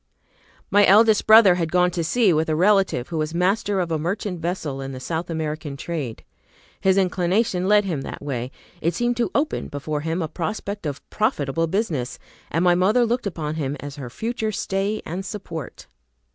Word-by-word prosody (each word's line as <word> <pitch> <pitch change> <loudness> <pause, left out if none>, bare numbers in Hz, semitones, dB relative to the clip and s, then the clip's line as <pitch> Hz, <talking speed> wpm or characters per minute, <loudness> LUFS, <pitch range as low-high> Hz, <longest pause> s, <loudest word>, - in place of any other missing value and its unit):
My 205 0 +6
eldest 215 +2 +5
brother 215 -4 +8
had 170 -3 -2
gone 180 0 +3
to 170 -1 -2
sea 205 +2 +3
with 160 +1 +1
a 155 - +1
relative 190 -7 +2
who 165 -2 -2
was 155 +2 -2
master 195 +2 +1
of 175 -2 -1
a 160 - 0
merchant 180 +2 -3
vessel 160 -5 -3
in 135 0 -5
the 130 - -6
South 165 +6 -4
American 155 -3 -4
trade. 145 -8 -5 0.6
His 190 0 +3
inclination 185 +1 +1
led 210 0 +4
him 165 -8 -2
that - - -7
way; 125 -4 -3 0.3
it 170 +2 0
seemed 240 0 0
to 240 - +1
open 300 +2 0
before 145 +1 -4
him 165 +3 -2
a - - -2
prospect 200 +2 -4
of 140 -2 -6
profitable 165 - 0
business, 160 - -2 0.3
and 165 +3 0
my 175 -1 +5
mother 205 +7 +3
looked 240 -1 -1
upon 155 -4 -4
him 145 -2 -2
as 145 0 -8
her 130 -4 -6
future 225 - -3
stay 200 +1 -2
and 180 +4 -4
support. 185 - -7
175 Hz, 185 wpm, -23 LUFS, 155-205 Hz, 0.6 s, brother